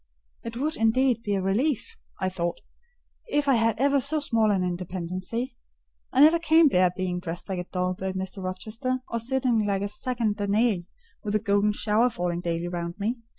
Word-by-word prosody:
"It 230 0 -6
would, 305 +5 -1
indeed, 235 +1 +2
be 205 -3 -1
a 190 - -1
relief," 260 - 0 0.2
I 190 - 0
thought, 175 -2 -2 0.7
"if 295 -5 +1
I 275 - +5
had 225 -2 +2
ever 280 +2 +3
so 305 +4 +2
small 230 -6 +1
an 195 -3 +2
independency; 185 +7 -3 0.6
I 265 - +3
never 315 +3 +7
can 325 -1 +5
bear 180 -5 +4
being 180 -1 -2
dressed 175 -1 -5
like 190 -2 -3
a 180 - -4
doll 180 0 0
by 190 +1 -4
Mr. 190 0 -5
Rochester, 225 +8 -3
or 230 - -2
sitting 245 -2 +1
like 200 -1 0
a - - 0
second 215 0 -1
Danae 205 -2 +1 0.4
with 210 -2 -3
the 215 - +3
golden 205 0 +2
shower 220 +4 +2
falling 175 -5 -2
daily 170 0 -2
round 170 -1 -4
me. 230 +5 -1
210 Hz, 190 wpm, -26 LUFS, 185-250 Hz, 0.7 s, never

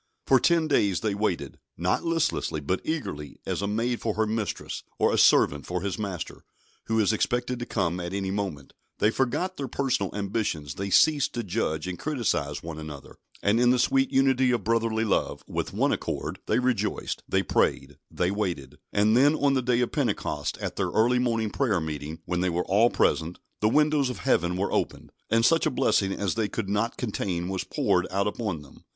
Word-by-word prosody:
For 130 - +5
ten 165 +1 +3
days 100 - +2
they 110 -2 0
waited, 100 -3 -2 0.2
not 90 +2 0
listlessly, 165 - 0
but 85 +6 -2
eagerly, 75 - -4
as - - -2
a 100 - -1
maid 115 +3 -1
for 110 -2 -1
her 110 - +2
mistress, 110 -1 -3 0.2
or - - +2
a - - +2
servant 70 -1 +4
for 90 0 -2
his 100 +1 -3
master, 95 -6 -5 0.4
who 110 0 +1
is 110 0 +3
expected 125 +2 -1
to 120 - -5
come 90 -4 -1
at 85 0 -4
any 95 -1 -2
moment; 95 -9 -4 0.2
they 105 - +3
forgot 150 +10 -1
their 140 - -3
personal 125 -7 0
ambitions; 100 - -2
they 100 +5 -4
ceased 145 - +4
to 120 - -2
judge 90 -6 -2
and 90 -1 -5
criticise 110 - -1
one 80 -1 -6
another, 75 -3 -9 0.3
and 105 +3 +3
in 120 0 +4
the 125 - +4
sweet 135 +2 +2
unity 130 -1 +3
of 120 -4 +1
brotherly 115 0 +1
love, 105 - 0
"with - - -3
one - - +1
accord" - - -3
they - - +2
rejoiced, 125 -2 -1
they - - +2
prayed, - - 0
they 90 +1 0
waited; 90 -10 -3
and 105 +2 +3
then 145 +5 +5
on 140 -2 +2
the 130 - +2
day 125 0 +1
of 120 - 0
Pentecost, 110 - -1
at - - -5
their - - 0
early 120 +3 +3
morning 115 -3 0
prayer 115 -8 +1
meeting, 80 0 -5
when 90 0 -1
they 90 - +1
were 85 +1 -1
all 105 +5 +4
present, 80 -5 +1 0.2
the 105 - +3
windows 150 0 +3
of 125 - -4
Heaven 90 +1 +1
were 100 +2 -1
opened, - - -2 0.2
and 115 +1 +3
such 165 +4 +4
a - - +3
blessing 100 -5 +2
as 100 -1 -1
they 110 -2 0
could 100 -2 -4
not 105 +3 0
contain 95 -6 -2
was 95 -1 -2
poured - - +1
out 100 +1 0
upon 105 -7 -3
them. 70 - -17
105 Hz, 200 wpm, -26 LUFS, 90-125 Hz, 0.4 s, For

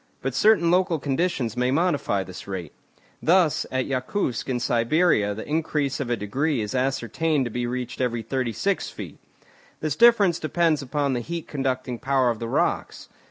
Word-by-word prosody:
But 135 -1 -1
certain 170 - +4
local 180 -2 +2
conditions 140 -4 -1
may 125 0 +1
modify 145 - +1
this 95 0 -10
rate. 90 -6 -5 0.5
Thus 170 -2 +3
at 130 -1 -1
Yakoutsk 130 - -2
in 125 -2 0
Siberia 120 - +2
the 110 - -7
increase 150 -2 -1
of 135 -4 -3
a 120 - 0
degree 135 +8 -1
is 105 +1 -3
ascertained 135 +3 0
to 120 - -4
be 120 +1 -2
reached 125 +1 -4
every 120 -2 -1
36 130 - -1
feet. - - -9 0.6
This 155 -2 -2
difference 210 -6 +5
depends 160 -1 +1
upon 140 +1 -1
the 125 - 0
heat 170 +6 -5
conducting 130 -3 -2
power 135 -3 +2
of 115 - -5
the 115 - -4
rocks. - - -1
135 Hz, 165 wpm, -24 LUFS, 120-160 Hz, 0.6 s, difference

